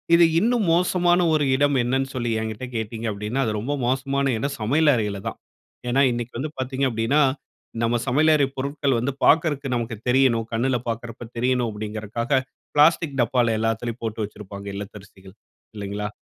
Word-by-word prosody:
இது 170 Hz, 0 st, +7 dB
இன்னும் 230 Hz, +2 st, +2 dB
மோசமான 175 Hz, 0 st, +3 dB
ஒரு 155 Hz, -2 st, +2 dB
இடம் 145 Hz, +1 st, +2 dB
என்னன்னு 135 Hz, +2 st, 0 dB
சொல்லி 120 Hz, -2 st, -1 dB
என்கிட்ட 110 Hz, +2 st, -4 dB
கேட்டீங்க 115 Hz, +1 st, -3 dB
அப்படினா? 105 Hz, +6 st, -3 dB
அது 110 Hz, -, 0 dB
ரொம்ப 130 Hz, +7 st, -2 dB
மோசமான 140 Hz, +2 st, 0 dB
இடம் 140 Hz, +4 st, -2 dB
சமையல் 145 Hz, +7 st, +3 dB
அறையிலதான். 105 Hz, -4 st, -3 dB, 0.5 s
ஏனா? 135 Hz, +3 st, +3 dB
இன்னைக்கு 120 Hz, 0 st, -4 dB
வந்து 150 Hz, +3 st, -3 dB
பார்த்தீங்க 130 Hz, +1 st, -1 dB
அப்படினா, 115 Hz, +6 st, +1 dB, 0.6 s
நம்ம 115 Hz, +1 st, +1 dB
சமையல் 155 Hz, +5 st, +4 dB
அறை 140 Hz, -2 st, +3 dB
பொருட்கள் 140 Hz, -1 st, 0 dB
வந்து 135 Hz, +4 st, -1 dB
பாக்குறக்கு 150 Hz, -3 st, +3 dB
நமக்கு 115 Hz, -2 st, -3 dB
தெரியணும், 125 Hz, -3 st, +3 dB
கண்ணுல 125 Hz, +3 st, +1 dB
பார்க்கிறப்போ 115 Hz, +1 st, -5 dB
தெரியணும், 125 Hz, -1 st, +1 dB
அப்படிங்கறதுக்காக 110 Hz, +5 st, -2 dB, 0.3 s
பிளாஸ்டிக் 150 Hz, -1 st, +4 dB
டப்பால 120 Hz, -1 st, +2 dB
எல்லாத்துலயும் 115 Hz, +1 st, -2 dB
போட்டு 110 Hz, -1 st, -3 dB
வச்சிருப்பாங்க 100 Hz, -1 st, -10 dB
இல்லத்தரிசிகள், 100 Hz, -1 st, -10 dB, 0.4 s
இல்லைங்களா? 105 Hz, 0 st, -4 dB
120 Hz, 150 wpm, -23 LUFS, 110-140 Hz, 0.6 s, இது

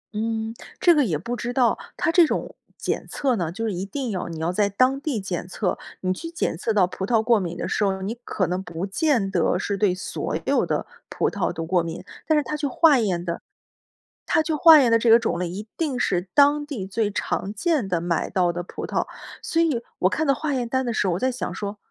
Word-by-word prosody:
嗯， 220 Hz, +1 st, -2 dB, 0.3 s
这 350 Hz, -, +6 dB
个 300 Hz, -3 st, +3 dB
也 165 Hz, -9 st, 0 dB
不 235 Hz, +10 st, -4 dB
知 240 Hz, 0 st, -4 dB
道。 245 Hz, -2 st, +3 dB, 0.2 s
它 345 Hz, -, +1 dB
这 335 Hz, -1 st, +6 dB
种 -, -, -3 dB, 0.2 s
检 -, -, -3 dB
测 265 Hz, -4 st, 0 dB
呢， 170 Hz, -6 st, -2 dB
就 225 Hz, +6 st, -4 dB
是 215 Hz, -, -1 dB
一 180 Hz, +1 st, -3 dB
定 240 Hz, +5 st, -4 dB
要 185 Hz, -3 st, -3 dB
你 165 Hz, -1 st, -6 dB
要 165 Hz, +2 st, 0 dB
在 205 Hz, +2 st, +1 dB
当 255 Hz, +7 st, +2 dB
地 285 Hz, -7 st, -2 dB
检 185 Hz, -3 st, -4 dB
测， 185 Hz, +1 st, -2 dB, 0.2 s
你 185 Hz, 0 st, 0 dB
去 330 Hz, -, -7 dB
检 335 Hz, -, -2 dB
测 195 Hz, +7 st, -2 dB
到 205 Hz, -4 st, +4 dB
葡 185 Hz, +1 st, -6 dB
萄 225 Hz, -1 st, +3 dB
过 230 Hz, -1 st, +4 dB
敏 175 Hz, -2 st, -4 dB
的 -, -, -3 dB
时 -, -, 0 dB
候， 190 Hz, -1 st, +1 dB
你 205 Hz, +4 st, -2 dB
可 190 Hz, -, -1 dB
能 180 Hz, +2 st, -2 dB
不 175 Hz, -1 st, -5 dB
见 215 Hz, -1 st, +1 dB
得 175 Hz, -1 st, +2 dB
是 200 Hz, +1 st, -2 dB
对 195 Hz, -2 st, +2 dB
所 185 Hz, -, -3 dB
有 -, -, +2 dB
的 -, -, -1 dB, 0.2 s
葡 -, -, 0 dB
萄 -, -, -1 dB
都 165 Hz, -, -5 dB
过 175 Hz, +1 st, +2 dB
敏。 165 Hz, 0 st, -6 dB, 0.2 s
但 315 Hz, -, +4 dB
是 300 Hz, -, +2 dB
他 300 Hz, -, -4 dB
去 300 Hz, -1 st, -1 dB
化 290 Hz, 0 st, +5 dB
验 180 Hz, -6 st, -1 dB
的 170 Hz, -1 st, -3 dB, 0.8 s
他 -, -, +3 dB
去 315 Hz, +1 st, -1 dB
化 315 Hz, +1 st, +8 dB
验 255 Hz, -4 st, +4 dB
的 230 Hz, -, +6 dB
这 230 Hz, -, +2 dB
个 230 Hz, +1 st, +8 dB
种 230 Hz, -6 st, -1 dB
类， 180 Hz, -1 st, -2 dB
一 205 Hz, +5 st, -6 dB
定 290 Hz, -6 st, -1 dB
是 180 Hz, -5 st, 0 dB
当 290 Hz, +1 st, +4 dB
地 250 Hz, -11 st, -5 dB
最 210 Hz, +1 st, -1 dB
常 200 Hz, 0 st, -2 dB
见 295 Hz, -, 0 dB
的， 175 Hz, -2 st, +1 dB
买 170 Hz, 0 st, -1 dB
到 180 Hz, -2 st, +1 dB
的 175 Hz, +1 st, -4 dB
葡 -, -, -7 dB
萄。 -, -, -1 dB, 0.4 s
所 330 Hz, -, 0 dB
以， 290 Hz, -8 st, +1 dB, 0.2 s
我 185 Hz, -, +3 dB
看 315 Hz, +9 st, -1 dB
到 275 Hz, -, +5 dB
化 295 Hz, +2 st, -2 dB
验 245 Hz, -3 st, -2 dB
单 260 Hz, +1 st, 0 dB
的 240 Hz, -, -1 dB
时 205 Hz, -, +1 dB
候 180 Hz, -, +1 dB
我 -, -, -3 dB
在 260 Hz, -, +1 dB
想 250 Hz, -, -4 dB
说： 205 Hz, 0 st, -5 dB
215 Hz, 270 characters per minute, -24 LUFS, 185-270 Hz, 0.8 s, 化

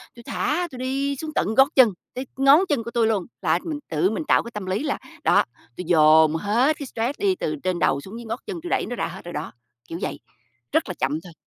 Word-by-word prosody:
tui 235 Hz, -, -13 dB
thả, 345 Hz, +9 st, -1 dB
tui 250 Hz, -, -9 dB
đi 275 Hz, +2 st, -1 dB
xuống 310 Hz, +3 st, -6 dB
tận 220 Hz, -, 0 dB
gót 270 Hz, +1 st, +7 dB
chân, 255 Hz, -4 st, +7 dB, 0.2 s
tới 255 Hz, +2 st, -5 dB
ngón 275 Hz, +5 st, +6 dB
chân 265 Hz, -6 st, +1 dB
của 235 Hz, -, -7 dB
tui 230 Hz, -2 st, +2 dB
luôn. 205 Hz, -5 st, 0 dB, 0.2 s
Là -, -, +2 dB
mình 305 Hz, -3 st, -4 dB
tự 160 Hz, +4 st, +2 dB
mình 265 Hz, +8 st, -3 dB
tạo -, -, +3 dB
cái 235 Hz, -, -9 dB
tâm 210 Hz, -3 st, -5 dB
lý 190 Hz, +9 st, -1 dB
là, 285 Hz, -, -1 dB, 0.3 s
đó, -, -, +5 dB, 0.3 s
tui 180 Hz, -, -5 dB
dồn 155 Hz, -1 st, +6 dB
hết 235 Hz, -, +2 dB
cái 285 Hz, -, -5 dB
stress 245 Hz, +8 st, -3 dB
đi 390 Hz, -2 st, +2 dB
từ 155 Hz, -, -2 dB
trên 185 Hz, -2 st, -1 dB
đầu 140 Hz, +1 st, +2 dB
xuống 205 Hz, +8 st, -9 dB
dưới 235 Hz, -, -9 dB
ngót 225 Hz, +3 st, -4 dB
chân, 355 Hz, -5 st, -5 dB
tui 350 Hz, -, -6 dB
đẩy -, -, +1 dB
nó 245 Hz, -, -5 dB
ra -, -, -2 dB
hết 175 Hz, +1 st, -10 dB
rồi 175 Hz, -, -7 dB
đó, 150 Hz, +2 st, -4 dB, 0.4 s
kiểu 170 Hz, -, -5 dB
vậy, -, -, -3 dB, 0.5 s
rất -, -, +1 dB
là -, -, -2 dB
chậm 150 Hz, +4 st, -1 dB
thôi. 175 Hz, -3 st, -12 dB
230 Hz, 260 wpm, -23 LUFS, 180-275 Hz, 0.5 s, gót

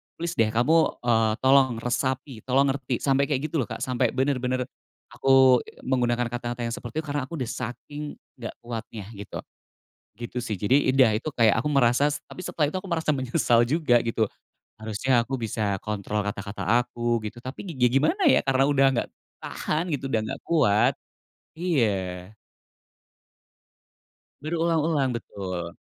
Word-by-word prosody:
plis 170 Hz, 0 st, -3 dB
deh, 115 Hz, -, +5 dB
kamu, 155 Hz, +8 st, +4 dB, 0.2 s
eee, 115 Hz, -2 st, +3 dB
tolong 130 Hz, -2 st, +5 dB
resapi, 130 Hz, 0 st, -2 dB
tolong 135 Hz, +2 st, +3 dB
ngerti", 135 Hz, -2 st, -3 dB
sampai 140 Hz, 0 st, +3 dB
kayak 145 Hz, +1 st, 0 dB
gitu 160 Hz, -, 0 dB
loh, 115 Hz, -, -3 dB
Kak, 110 Hz, -, -5 dB
sampai 125 Hz, -2 st, +1 dB
bener-bener 130 Hz, -1 st, 0 dB, 0.5 s
aku 130 Hz, -2 st, +5 dB, 0.2 s
menggunakan 120 Hz, -2 st, +1 dB
kata-kata 120 Hz, 0 st, -4 dB
yang -, -, -4 dB
seperti 120 Hz, +6 st, -5 dB
itu. -, -, -13 dB
Karena 145 Hz, -2 st, -2 dB
aku 170 Hz, -, -6 dB
udah 125 Hz, -3 st, -3 dB
saking 145 Hz, +5 st, -6 dB, 0.2 s
nggak 115 Hz, -2 st, -6 dB
kuatnya 115 Hz, -3 st, -6 dB
gitu, 100 Hz, -, -7 dB, 0.8 s
gitu 120 Hz, +2 st, -6 dB
sih, 110 Hz, -4 st, -3 dB
Jadi 130 Hz, +5 st, +3 dB
udah, 130 Hz, -4 st, +6 dB
itu 130 Hz, -, -16 dB
kayak 115 Hz, -3 st, +4 dB
aku 150 Hz, -, -2 dB
merasa 130 Hz, +1 st, +4 dB, 0.2 s
tapi -, -, -12 dB
setelah 150 Hz, -3 st, 0 dB
itu 185 Hz, -, -1 dB
aku 195 Hz, -, -11 dB
merasa 160 Hz, -2 st, 0 dB
menyesal 120 Hz, -2 st, +2 dB
juga, 145 Hz, -5 st, +3 dB
gitu, 115 Hz, -1 st, 0 dB, 0.6 s
harusnya 115 Hz, +3 st, +1 dB
aku 135 Hz, -, -4 dB
bisa 105 Hz, -2 st, -1 dB
kontrol 105 Hz, 0 st, -2 dB
kata-kata 100 Hz, 0 st, -5 dB, 0.2 s
aku, 120 Hz, -1 st, -1 dB
gitu, 110 Hz, +3 st, -7 dB
tapi 135 Hz, +9 st, -7 dB
gi 125 Hz, -2 st, +3 dB
gimana 155 Hz, -, +2 dB
ya, -, -, +5 dB
karena 135 Hz, 0 st, +3 dB
udah 135 Hz, -1 st, +4 dB
nggak 120 Hz, -, -1 dB, 0.3 s
tahan, 165 Hz, +3 st, -2 dB
gitu, 135 Hz, -1 st, -3 dB
udah 110 Hz, -4 st, +1 dB
nggak 135 Hz, +5 st, -6 dB
kuat. 105 Hz, -11 st, +3 dB, 0.6 s
Iya. 105 Hz, -, -1 dB, 2.1 s
Berulang-ulang, 160 Hz, -3 st, +1 dB
betul. 90 Hz, -6 st, -6 dB
125 Hz, 155 wpm, -25 LUFS, 115-140 Hz, 2.1 s, udah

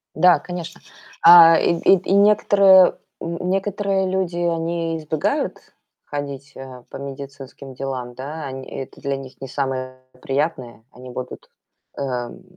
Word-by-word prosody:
Да, 180 Hz, +2 st, +5 dB
конечно. 175 Hz, -2 st, -8 dB, 0.4 s
А, 165 Hz, -1 st, +9 dB
и -, -, +2 dB
и 195 Hz, -, +5 dB
и 185 Hz, +1 st, -2 dB
некоторые 200 Hz, -2 st, +5 dB, 0.2 s
н 170 Hz, 0 st, -5 dB
некоторые 195 Hz, 0 st, -1 dB
люди, 185 Hz, -2 st, -2 dB
они 165 Hz, -1 st, -1 dB
избегают 155 Hz, -1 st, -2 dB, 0.5 s
ходить, 140 Hz, -1 st, -6 dB
э, 130 Hz, -2 st, -10 dB
по -, -, -8 dB
медицинским 140 Hz, 0 st, -9 dB
делам, 130 Hz, -2 st, -5 dB
да. 145 Hz, +5 st, -7 dB
Они 130 Hz, -1 st, -7 dB
это 135 Hz, -1 st, -8 dB
для 140 Hz, 0 st, -2 dB
них 135 Hz, -1 st, -10 dB
не 135 Hz, -, -6 dB
самое 130 Hz, -1 st, -4 dB, 0.2 s
приятное. 135 Hz, -5 st, -3 dB
Они 125 Hz, +1 st, -12 dB
будут, 125 Hz, 0 st, -8 dB, 0.5 s
эм, 125 Hz, +4 st, -5 dB
145 Hz, 135 wpm, -21 LUFS, 135-175 Hz, 0.5 s, А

